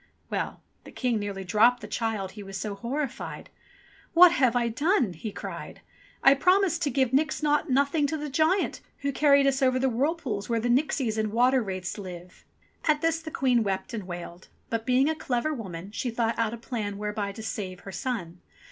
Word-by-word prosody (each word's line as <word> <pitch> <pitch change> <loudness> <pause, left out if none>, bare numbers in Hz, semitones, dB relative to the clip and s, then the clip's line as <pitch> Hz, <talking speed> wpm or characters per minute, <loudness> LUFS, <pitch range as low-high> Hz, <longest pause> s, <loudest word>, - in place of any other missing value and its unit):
Well! - - -3 0.2
the - - -12
King 245 -4 0
nearly 200 -2 -4
dropped 225 +6 +4
the - - -7
child, 220 -5 -2
he 210 - -10
was 195 -1 -7
so 210 +1 -3
horrified. 260 +5 -4 0.6
"What 350 0 +9
have 255 -7 +2
I 240 -1 +2
done?" 255 - +1
he 205 +6 -6
cried. - - -7 0.4
"I 275 - +8
promised 360 +3 +3
to 295 - +1
give 265 -3 +1
nix 305 +3 +1
naught 295 -1 +2
nothing 280 +3 +2
to 315 - -2
the 300 0 -4
giant 320 +7 +1 0.2
who 280 0 0
carried 280 0 +4
us 275 0 +2
over 255 -1 +3
the 265 +1 +2
whirlpools 255 -5 -1
where 230 -1 +1
the 240 +2 -1
nixies 250 -4 +1
and 215 -1 0
water 250 +3 +4
wraiths 190 -2 -4
live." 180 -2 -10 0.4
At 300 -2 +3
this 330 0 +1
the 320 -1 -7
Queen 255 -5 +2
wept 195 +1 -2
and 210 -5 -5
wailed; 175 0 -8 0.2
but 230 +1 -2
being 255 +2 +4
a 315 - +2
clever 305 -1 -1
woman 190 - -7
she 245 +3 -3
thought 230 0 -1
out 230 0 0
a - - -10
plan 220 -4 -4
whereby 210 -1 -3
to 220 - -8
save 190 -4 -5
her 195 - -8
son. 185 -5 -4
240 Hz, 200 wpm, -27 LUFS, 205-280 Hz, 0.6 s, What